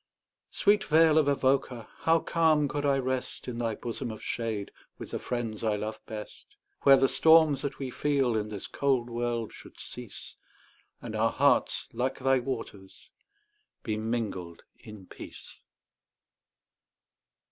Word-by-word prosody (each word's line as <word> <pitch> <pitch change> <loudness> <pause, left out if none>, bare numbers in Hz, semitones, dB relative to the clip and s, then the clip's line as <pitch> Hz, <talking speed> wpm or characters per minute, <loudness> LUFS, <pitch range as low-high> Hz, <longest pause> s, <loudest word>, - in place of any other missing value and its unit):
Sweet 205 0 +3
vale 160 -1 +5
of 150 - +2
Avoca! 130 -4 +1
how 165 0 +4
calm 155 -3 +2
could 145 +1 -2
I 140 -1 +3
rest 130 -1 -3
In 120 -1 -4
thy 115 -2 -1
bosom 120 0 -5
of 110 -1 -8
shade, 110 -4 -3 0.3
with - - -9
the - - -3
friends 115 -3 -4
I 110 -2 +1
love 110 +1 -4
best, 105 -1 -9 0.3
Where 135 -1 +7
the 135 0 +4
storms 160 -2 +5
that 140 -2 -4
we 135 -2 -5
feel 135 -4 +1
in 105 -1 -1
this 105 -3 -6
cold 130 -4 0
world 120 -1 -2
should - - -14
cease, - - -9 0.7
And - - -5
our - - +2
hearts, - - +2
like 130 +2 -1
thy 135 0 +2
waters, 115 -7 -7 0.7
be 110 - -2
mingled 110 -6 -3 0.2
in 105 -3 -12
peace. - - -12
125 Hz, 145 wpm, -29 LUFS, 110-140 Hz, 0.7 s, Where